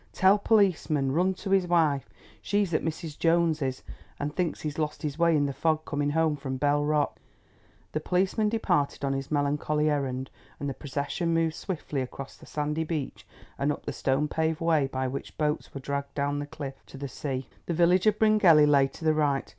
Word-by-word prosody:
Tell 195 +2 +5
policeman—run 180 -5 +2
to 195 +1 -6
his 190 -2 +3
wife. 160 -6 +2 0.3
She's 200 -4 0
at 155 - +2
Mrs. 160 -1 -5
Jones's, 160 -6 +1 0.4
and 145 +1 -3
thinks 175 -4 -1
he 155 - -2
has 150 - -8
lost 150 -1 -2
his 150 +1 -3
way 170 -2 +4
in 145 - +2
the 140 - -2
fog 155 +1 0
coming 145 0 -1
home 160 0 +2
from 130 -2 -4
Bell 145 +2 +2
Rock." 150 -1 0 0.7
The 155 - -1
policeman 190 +6 +1
departed 175 -11 0
on 135 - 0
his 135 0 -4
melancholy 150 +1 +1
errand 130 -2 -2 0.3
and 145 - -3
the 135 - -2
procession 145 +5 -2
moved 165 -1 +1
swiftly 155 -6 -4
across 135 +1 -7
the - - -16
sandy 150 +1 -1
beach 155 -4 -4 0.3
and 140 +2 +2
up - - -6
the - - -3
stone 135 +3 0
paved 160 +1 -1
way 160 -4 +2
by 130 -1 -2
which 135 +2 -6
boats 150 -1 -1
were 140 - -6
dragged 140 +1 -4
down 145 0 0
the 145 - -4
cliff 140 -2 -8
to - - -11
the 140 +1 -4
sea. 135 -1 -4 0.2
The 170 - -1
village 175 +4 +4
of 210 -1 +4
Bryngelly 210 -9 +6
lay 140 -2 +4
to 160 - -10
the 155 - +4
right. 145 -3 +1
150 Hz, 200 wpm, -27 LUFS, 140-165 Hz, 0.7 s, Bryngelly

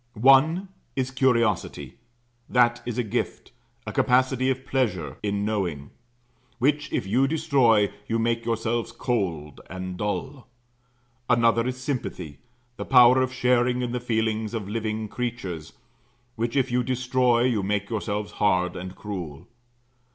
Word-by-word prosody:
One 135 - +4 0.3
is 130 -1 -1
curiosity; 115 -6 0 0.6
that 120 -1 +3
is 120 -1 -3
a 125 - +1
gift, 105 - -3 0.3
a - - -4
capacity 130 +1 +2
of 130 0 -2
pleasure 110 - -1
in 100 -1 -1
knowing; 90 -10 -2 0.7
which 145 +2 0
if - - -1
you 130 +8 +2
destroy, 135 -9 +3 0.2
you 115 - 0
make 115 0 0
yourselves 115 0 -1
cold 85 - -3
and 95 0 -6
dull. 130 +7 -4 0.8
Another 115 -1 +3
is 130 0 -3
sympathy; 120 - -4 0.4
the - - -4
power 125 0 +6
of 130 0 0
sharing 125 0 +2
in 120 - -2
the 125 - -2
feelings 110 -2 -1
of 105 -4 -4
living 110 0 -3
creatures, 100 -10 -5 0.6
which 115 +2 -2
if 130 -2 +1
you 125 +1 +2
destroy, 125 -1 +1
you 120 -5 +1
make 100 +2 -2
yourselves 105 -1 -3
hard 90 -3 +1
and 90 +1 -7
cruel. 90 -9 -7
115 Hz, 135 wpm, -25 LUFS, 105-130 Hz, 0.8 s, power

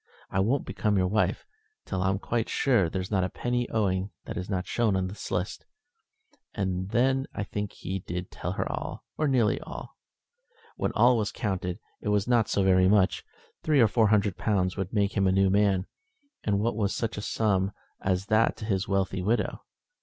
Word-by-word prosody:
"I 95 - 0
won't 120 +8 +1
become 105 -2 0
your 95 - +3
wife 95 0 0 0.4
till 95 -2 -2
I'm 95 +1 +1
quite 115 +3 -2
sure 115 - +2
there's 95 +2 -4
not 95 -3 +2
a 90 - -1
penny 120 +5 -2
owing 95 -3 0 0.2
that 110 - -6
is 90 -1 -4
not 95 -2 -1
shown 115 -5 +1
in 95 -1 +1
the 95 +3 -6
list." 90 +2 -3 0.9
Then 105 +8 +1
I 105 - -2
think 105 0 -4
he 95 +2 -4
did 90 0 -5
tell - - -4
her - - -2
all, - - -5 0.2
or 155 - +2
nearly 125 -6 +2
all. - - -9 0.8
When - - -1
all 120 +2 +5
was 110 -2 -1
counted 90 -4 -2 0.2
it - - -2
was 105 0 +1
not 120 -3 +3
so 100 - +2
very 95 -1 +5
much. 100 -1 +3 0.4
Three 150 -3 +3
or 115 - +7
four 110 0 +3
hundred 105 -2 +2
pounds 95 -4 +1
would 95 -2 -3
make 100 -2 +1
him 100 -2 +3
a - - +4
new 95 0 +3
man, 100 -2 +3 0.6
and 100 -2 +1
what 110 +2 0
was 105 -2 0
such 115 - -2
a 105 - -4
sum 100 -3 +1 0.3
as 95 0 0
that 110 +2 +2
to 105 - -6
his 100 -3 0
wealthy 95 -1 0
widow! 110 +6 0
100 Hz, 195 wpm, -28 LUFS, 95-110 Hz, 0.9 s, or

